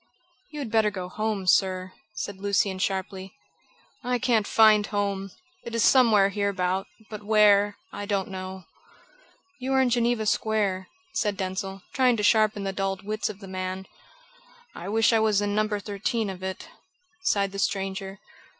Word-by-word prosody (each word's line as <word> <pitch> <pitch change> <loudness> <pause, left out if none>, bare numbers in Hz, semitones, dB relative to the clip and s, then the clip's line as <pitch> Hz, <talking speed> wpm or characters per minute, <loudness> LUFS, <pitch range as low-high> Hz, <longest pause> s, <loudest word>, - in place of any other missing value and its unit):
"You 300 - -10
had 270 -7 -5
better 220 -1 +3
go 185 -3 -6
home, 215 -1 -2
sir," 185 0 +2 0.2
said 200 -2 -5
Lucian 200 -1 0
sharply. 190 +1 -3 0.7
"I 250 0 0
can't 230 -3 +1
find 215 -2 +5
home. 200 -1 -2 0.3
It 235 - -6
is 230 - +2
somewhere 220 -7 +5
hereabout, 195 -2 -1 0.2
but 210 -1 -6
where, 205 -1 +4 0.2
I 205 - -5
don't 200 -2 -1
know." 190 0 -7 1.0
"You 260 +1 -2
are 265 - +4
in 260 -2 +3
Geneva 235 -2 +1
Square," 205 -3 0 0.3
said 205 -3 -1
Denzil, 190 0 -4
trying 255 -3 +3
to 210 - -2
sharpen 215 -1 +3
the 195 0 -2
dulled 195 0 -3
wits 215 +1 -2
of 210 -1 -9
the 195 - -9
man. 185 0 -4 0.9
"I 175 - -7
wish 225 +2 +3
I 225 - +4
was 215 -2 +3
in 205 0 -1
No. 215 +1 +2
13 210 +1 -2
of 185 -1 -10
it," 190 0 -5 0.5
sighed 200 - +1
the 195 - -6
stranger. 195 0 -2
205 Hz, 160 wpm, -26 LUFS, 190-215 Hz, 1.0 s, find